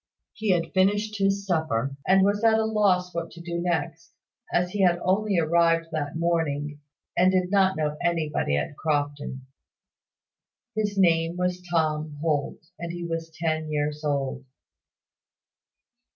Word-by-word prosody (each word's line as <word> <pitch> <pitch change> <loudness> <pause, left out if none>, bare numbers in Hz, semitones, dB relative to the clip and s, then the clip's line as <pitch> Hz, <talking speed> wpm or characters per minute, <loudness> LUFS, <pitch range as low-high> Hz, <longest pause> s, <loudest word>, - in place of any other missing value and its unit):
He 220 -1 -3
had 175 -3 +1
finished 205 +2 +1
his 195 0 +1
supper, 140 -8 0
and 190 0 +5
was 205 +2 +1
at 225 -1 +5
a 220 - +1
loss 190 -5 +2
what 170 0 -3
to 170 - -12
do 170 0 -4
next, 165 -1 -3 0.4
as 180 0 +1
he 205 - -1
had 175 -2 +4
only 195 +1 +1
arrived 165 0 +3
that 150 -2 -3
morning, 150 -3 -1 0.4
and 185 +1 +4
did 185 -1 +1
not 190 -3 +3
know 150 -1 -1
anybody 155 - 0
at 70 - -3
Crofton. 145 -3 -2 1.3
His 205 -2 -1
name 165 -2 +3
was 180 0 -1
Tom 155 -3 0
Holt, 155 0 -1
and 170 0 -4
he 175 0 -5
was 165 -1 -3
ten 160 -1 -2
years 150 0 -2
old. 140 -2 -1
170 Hz, 145 wpm, -26 LUFS, 155-185 Hz, 1.3 s, and